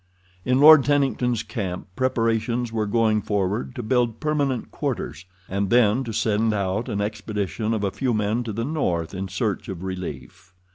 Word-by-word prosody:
In 125 +1 +2
Lord 155 0 +9
Tennington's 130 -5 +1
camp 95 -7 -4
preparations 115 -1 0
were 110 -2 0
going 110 -1 +2
forward 95 -9 -2
to 120 - -4
build 120 -1 +1
permanent 145 -5 -1
quarters, 90 - -4 0.2
and 100 +1 -1
then 120 +2 +4
to 115 - -4
send 110 0 +1
out 100 +3 -1
an 100 - -1
expedition 105 +1 -3
of 110 -2 -1
a 100 - 0
few 130 +3 -1
men 110 +2 0
to 115 - -3
the 115 +3 -3
north 90 - -1
in 95 0 -4
search 95 +2 -2
of 95 -2 -6
relief. 90 -2 -7
110 Hz, 165 wpm, -24 LUFS, 100-125 Hz, 0.2 s, Lord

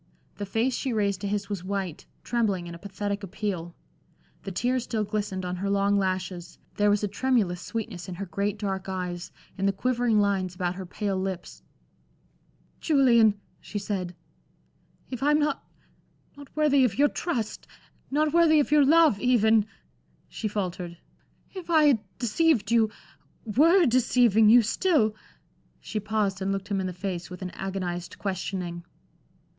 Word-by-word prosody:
The 205 - -5
face 230 +6 0
she 260 -1 -2
raised 200 -3 0
to 200 - -2
his 200 0 -2
was 200 -4 -4
white, 190 -4 -4 0.2
trembling 210 -7 0
in 170 - -7
a 170 - -10
pathetic 200 +1 -4
appeal. 190 -4 -4 0.7
The 195 - -6
tears 245 +6 0
still 220 -3 -2
glistened 205 -3 -3
on 180 0 -3
her 195 +2 -2
long 200 0 +2
lashes, 185 -3 -2 0.2
there 205 0 +3
was 205 0 +2
a - - +2
tremulous 205 -5 0
sweetness 215 -7 -5
in 180 - -5
her 200 +3 -5
great 200 +3 -2
dark 195 -2 -3
eyes, 180 -2 -4 0.3
in 195 - +1
the - - +4
quivering 240 +1 +1
lines 195 -3 0
about 180 -1 -1
her 185 0 -7
pale 195 0 -2
lips. 185 -2 -5 1.2
"Julian," 235 -8 +4 0.2
she 210 - -7
said, 190 -3 -3 1.0
"if 255 -1 -5
I'm 295 +2 +4
not 300 0 0 0.7
not 285 -1 -12
worthy 290 -3 +4
of 230 -6 +1
your 290 +1 +5
trust 250 - -3 0.4
not 300 +2 +1
worthy 330 -2 +5
of 290 - 0
your 300 -1 +6
love, 310 -6 +5
even" 220 -3 +3 0.6
she 220 - -4
faltered 180 -4 -4 0.6
"if 370 -3 -8
I 320 -2 +5
had 280 -6 +5 0.2
deceived 240 -2 +1
you 225 -2 +4 0.6
were 330 - +5
deceiving 235 -4 +4
you 240 +1 +7
still" 230 - +2 0.7
she 215 - -4
paused 205 -2 -1
and 195 +1 0
looked 195 +1 -4
him 195 -2 0
in 185 - -2
the - - -3
face 180 -1 -5
with 180 +1 -8
an 180 - -5
agonized 180 -2 -4
questioning. 180 -3 -4
205 Hz, 160 wpm, -26 LUFS, 190-245 Hz, 1.2 s, you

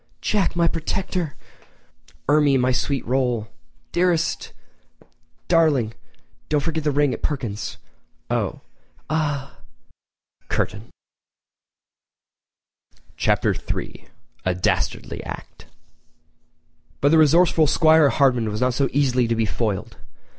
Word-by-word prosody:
"Jack, 205 -4 0
my 170 -1 +3
protector!" 170 -1 -2 0.9
"Ermie, 145 -1 +4
my 130 0 +2
sweet 135 +1 -1
roll!" 125 -3 0 0.4
"Dearest!" 175 -2 0 1.0
"Darling!—and 145 -10 +2 0.5
don't 150 - +2
forget 160 0 -2
that - - +3
ring 145 -2 +2
at - - -6
Perkins'." 105 - -3 0.5
"Oh!" - - -2 0.5
"Ah!" 145 - -2 0.9
[Curtain] 105 +3 -2 2.3
Chapter - - +2
III: - - -6 0.4
A 95 -1 0
Dastardly 90 - -1
Act[edit] - - -9 1.3
But 145 - +3
the 160 +1 +5
resourceful 160 +1 +5
'Squire 155 0 +5
Hardman 125 -6 +2
was 105 0 -3
not 125 0 +2
so 135 +2 +1
easily 130 -3 +2
to 115 - 0
be 115 0 +1
foiled. 105 -3 -3
140 Hz, 105 wpm, -22 LUFS, 120-160 Hz, 2.3 s, the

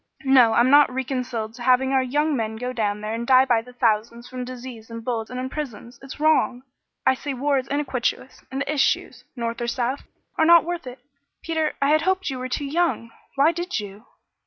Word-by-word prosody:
"No, 255 -4 +6
I'm 240 +3 +4
not 290 -2 +6
reconciled 250 -4 -3
to 240 - -12
having 255 +2 +3
our 265 - +4
young 295 +4 0
men 220 -3 -2
go 250 +3 -4
down 210 -3 -1
there 215 +1 -4
and 235 +1 -4
die 260 0 +6
by 235 -3 +2
the 250 +2 -14
thousands 235 0 0
from 255 -1 -6
disease 245 -2 -9
and 230 0 -8
bullets 230 -3 -2
and 250 +1 -5
in 255 - -3
prisons. 255 -4 -7
It's 270 +1 -10
wrong! 300 -5 +2 0.4
I - - +5
say 275 +1 -5
war 280 +2 +1
is 260 - -7
iniquitous, 270 -2 -2
and 270 +1 -4
the 280 +2 -1
issues, 280 -3 0
North 235 -1 -4
or 240 - -2
South, 250 +2 -2 0.4
are 320 - +5
not 335 0 +7
worth 345 -4 -4
it. 250 +1 -10 0.4
Peter, 320 -2 -1
I 280 - +3
had 310 +1 +4
hoped 375 -1 0
you 260 - -5
were 255 0 -5
too 285 - -2
young. 300 -6 -1 0.2
Why 285 +4 +4
did 345 -2 -3
you?" 205 +2 -9
255 Hz, 215 wpm, -23 LUFS, 235-285 Hz, 0.4 s, not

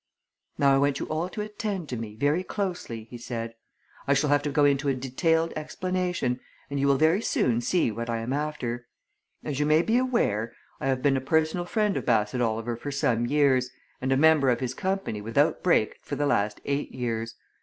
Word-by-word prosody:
"Now 140 -1 +4
I 135 - +4
want 140 0 +1
you - - -3
all 160 +3 -1
to 210 - -5
attend 210 -5 -4
to 125 - -3
me, 110 -2 -6
very 145 +8 +1
closely," 180 - -4
he 120 - -8
said. 115 -1 -5 0.5
"I 140 - +4
shall 145 +1 +2
have 145 0 +4
to 145 - -2
go 145 0 +3
into 140 0 +2
a 135 - +2
detailed 160 +6 0
explanation, 180 -5 -2 0.3
and 140 - -1
you 140 - +2
will 140 -1 +4
very 160 +7 +3
soon 120 - +1
see 130 0 +1
what 115 +2 -5
I 115 - 0
am 115 +3 -3
after. 125 -5 -3 0.6
As 145 -3 -3
you 150 - +2
may 155 +2 +4
be 230 +5 +2
aware, 120 - 0 0.2
I - - -2
have 130 -1 0
been 140 -2 +3
a - - -2
personal 160 +5 +1
friend 210 +1 0
of - - -5
Bassett 115 +1 +2
Oliver 115 0 -1
for 120 +5 -6
some 120 -4 +1
years, 135 -2 +3 0.3
and 130 +1 -1
a 135 - +4
member 155 -2 +5
of 120 - +2
his 130 -1 -2
company 190 - -2
without 110 +2 +1
break - - +2
for - - -5
the 145 - 0
last 105 -7 0
eight 140 +1 -1
years. 115 -2 -3
140 Hz, 210 wpm, -27 LUFS, 120-160 Hz, 0.6 s, member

